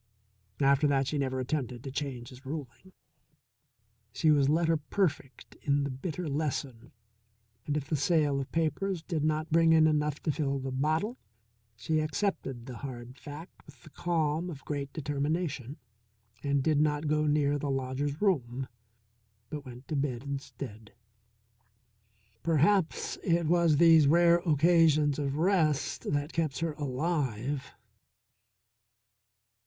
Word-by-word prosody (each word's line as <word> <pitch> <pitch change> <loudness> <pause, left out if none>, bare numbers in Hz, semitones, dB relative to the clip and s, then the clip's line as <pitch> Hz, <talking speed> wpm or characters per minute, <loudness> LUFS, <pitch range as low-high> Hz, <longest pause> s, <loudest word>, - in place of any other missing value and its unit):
After 140 +1 +4
that 135 -1 +2
she 145 +2 -2
never 130 -1 -1
attempted 130 -2 -3
to 135 - -6
change 130 -4 -4
his 130 +1 -14
ruling. 145 +3 -7 1.2
She 155 +6 +2
was 140 -2 +4
letter 165 +1 +3
perfect 150 -4 -3
in 145 0 +1
the 140 - -2
bitter 160 +6 -4
lesson, 140 -5 -3 0.8
and 145 0 0
if 140 -2 -4
the 155 - 0
sale 150 -1 +2
of 135 - -5
papers 165 +2 -1
did 165 -5 -2
not 155 +1 0
bring 165 0 +5
in 160 -1 +6
enough 150 -1 +1
to 155 - +1
fill 140 -2 -1
the 135 0 -4
bottle, 155 - 0 0.6
she 155 +8 -1
accepted 155 - -2
the 125 -3 -8
hard 125 -2 -8
fact 150 +5 -10
with 140 -5 -17
the 155 - -14
calm 165 0 -1
of 145 -5 -9
great 140 -2 -3
determination 145 -2 -2 0.6
and 140 -1 +1
did 150 0 +3
not 150 0 +1
go 150 0 +1
near 145 -1 +2
the 145 - -3
lodger's 135 +2 -2
room, 135 - 0 0.8
but 145 -3 -6
went 125 +1 -11
to 155 - -3
bed 135 -3 -1
instead. 135 -6 -7 1.5
Perhaps 165 +2 +1
it 170 -1 +2
was 170 -2 +3
these 160 -2 +7
rare 170 +2 +5
occasions 155 -2 +4
of 140 -1 -2
rest 160 -7 +1
that 145 +2 -1
kept 160 -5 -1
her 165 -2 -1
alive. 140 -3 -2
145 Hz, 140 wpm, -30 LUFS, 135-160 Hz, 1.5 s, these